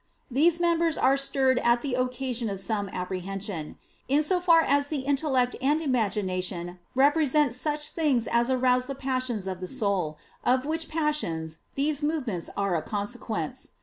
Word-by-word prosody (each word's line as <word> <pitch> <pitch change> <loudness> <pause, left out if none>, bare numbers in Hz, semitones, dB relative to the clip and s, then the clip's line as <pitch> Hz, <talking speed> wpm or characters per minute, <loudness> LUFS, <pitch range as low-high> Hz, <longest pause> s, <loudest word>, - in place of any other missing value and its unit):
These 325 +7 +4
members 335 -2 +2
are 265 +1 +4
stirred 270 -2 +2
at 235 0 +2
the 275 -3 -2
occasion 250 -2 -1
of 195 -1 -3
some 205 0 -1
apprehension; 185 -2 -4 0.3
in 285 +3 +3
so 360 +4 +1
far 335 -2 +5
as 285 -2 +2
the 290 -2 -2
intellect 265 -2 +1
and 290 +4 +2
imagination 185 - -1 0.2
represent 290 0 +3
such 295 +3 -1
things 280 -8 +1
as 235 +1 +2
arouse 255 -1 +2
the 275 - -4
passions 255 -6 -2
of 190 -1 -4
the 185 - -5
soul, 200 - -1 0.3
of 255 +2 +2
which 320 +2 -2
passions 230 - -2 0.2
these 290 +1 0
movements 270 - -2
are 200 -3 +1
a 160 - 0
consequence. 205 -2 -4
255 Hz, 155 wpm, -27 LUFS, 200-295 Hz, 0.3 s, far